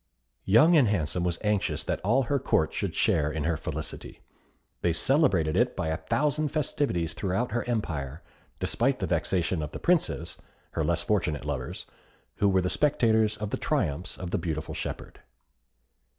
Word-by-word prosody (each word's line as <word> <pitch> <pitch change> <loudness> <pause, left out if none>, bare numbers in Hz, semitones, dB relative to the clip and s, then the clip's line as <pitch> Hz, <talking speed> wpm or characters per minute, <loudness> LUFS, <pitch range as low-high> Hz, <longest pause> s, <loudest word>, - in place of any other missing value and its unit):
Young 155 - +6
and 140 -7 +5
Handsome 90 -4 0
was 85 -1 0
anxious 105 -2 0
that - - -2
all 120 +8 +2
her 140 +3 0
Court 80 -9 +1
should - - -3
share 75 -2 +2
in 75 -1 -3
her 85 +1 +1
felicity. 80 0 -5 0.6
They 85 - +2
celebrated 90 - +2
it 125 +1 +2
by 80 -4 -2
a 80 - -1
thousand 150 - 0
festivities 135 - -1
throughout 100 +7 -1
her 120 +1 -1
empire, 80 - -3 0.4
despite - - +1
the - - -2
vexation 90 -2 0
of 75 - -5
the - - -5
princes, 150 - 0 0.3
her - - -1
less - - +1
fortunate 75 -2 0
lovers, 70 -4 -4 0.5
who 100 - +3
were 95 -1 +3
the 90 - -1
spectators 110 -7 +2
of 105 -1 -4
the - - -1
triumphs 75 +6 -1
of 90 -1 -6
the - - 0
beautiful 80 -3 -3
shepherd. - - -6
90 Hz, 165 wpm, -27 LUFS, 80-120 Hz, 0.6 s, Young